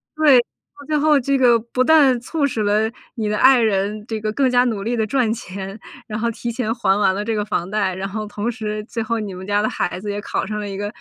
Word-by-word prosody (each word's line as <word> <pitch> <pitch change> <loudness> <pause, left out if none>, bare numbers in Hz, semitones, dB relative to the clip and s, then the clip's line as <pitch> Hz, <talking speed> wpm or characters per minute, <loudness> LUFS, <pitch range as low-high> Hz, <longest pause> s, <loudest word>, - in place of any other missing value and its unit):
对， 300 -5 +6
到 285 +4 -9
最 305 - +1
后 300 -1 +4
这 275 +2 +1
个 245 -3 +5
不 235 +3 -1
但 280 -3 +5
促 290 +4 -1
使 235 -5 -3
了 210 +2 +2 0.3
你 220 -3 -2
的 210 - 0
爱 260 +1 +6
人 210 0 0
这 220 -2 -3
个 215 0 -1
更 265 +3 +2
加 245 0 +4
努 220 -5 -2
力 235 +3 -1
地 220 - +1
赚 245 -1 +1
钱， 195 -2 -7 0.3
然 215 - -4
后 235 +1 0
提 235 +1 -5
前 225 -1 -2
还 195 -4 +2
完 190 -2 +3
了 205 - -2
这 225 0 -1
个 210 - 0
房 185 -4 -2
贷， 200 -2 0
然 190 +1 -4
后 215 +2 -4
同 210 +2 -3
时 215 -2 -4
最 230 0 -4
后 230 +1 -1
你 205 -3 -5
们 185 +1 -8
家 205 0 +2
的 215 - 0
孩 180 - -2
子 205 +2 -6
也 205 - -3
考 - - -2
上 210 +1 -4
了 205 - -4
一 195 - -5
个， 205 +1 -3
220 Hz, 290 characters per minute, -20 LUFS, 205-245 Hz, 0.3 s, 对